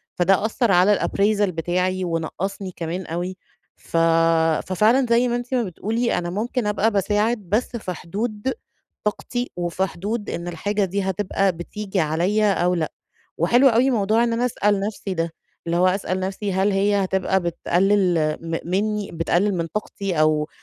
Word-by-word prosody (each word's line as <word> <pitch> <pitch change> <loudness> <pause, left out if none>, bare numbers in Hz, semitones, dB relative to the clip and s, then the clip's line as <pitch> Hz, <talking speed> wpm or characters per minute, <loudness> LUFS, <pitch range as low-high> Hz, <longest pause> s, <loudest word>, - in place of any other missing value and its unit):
فده 190 +3 +3
أثر 225 0 +1
على 190 +3 +4
الappraisal 205 0 +1
بتاعي، 180 +2 -1
ونقصني 180 +3 -3
كمان 170 +2 -4
أوي. 175 +3 -4 0.4
ف - - -5 0.7
ففعلًا 220 +8 +3
زي 235 +2 +4
ما 240 - 0
أنتِ 245 +2 -4
ما 245 - +2
بتقولي 225 +5 -1
أنا 175 - -4
ممكن 220 +5 -2
أبقى 210 +2 +1
باساعد 210 +3 +1
بس 235 +5 0
في 185 -5 -4
حدود 210 +8 -3 0.5
طاقتي، 245 +4 -2
وفي 175 +2 -1
حدود 205 +5 -4
إن 170 +1 -4
الحاجة 200 +4 -1
دي 195 +2 -2
هتبقى 190 0 0
بتيجي 190 +3 -4
عليَّ 175 +7 +1
أو 180 -1 +1
لأ، 160 -3 -2 0.5
وحلو 240 - +4
أوي 245 +3 +3
موضوع 220 0 +2
إن 235 -1 +1
أنا 240 +2 +1
أسأل 210 -4 +1
نفسي 200 -1 -3
ده، 165 -1 -2 0.3
اللي 170 +1 +1
هو 180 +1 +4
أسأل 185 0 0
نفسي 190 +1 -3
هل 190 +2 +2
هي 200 +1 +2
هتبقى 190 0 +1
بتقلل 175 -2 +1
م 165 0 -3
مِنّي، 210 +2 -1
بتقلل 175 +4 +1
من 165 -1 -1
طاقتي، 195 -2 -3
أو 155 0 +2
195 Hz, 160 wpm, -22 LUFS, 175-210 Hz, 0.7 s, على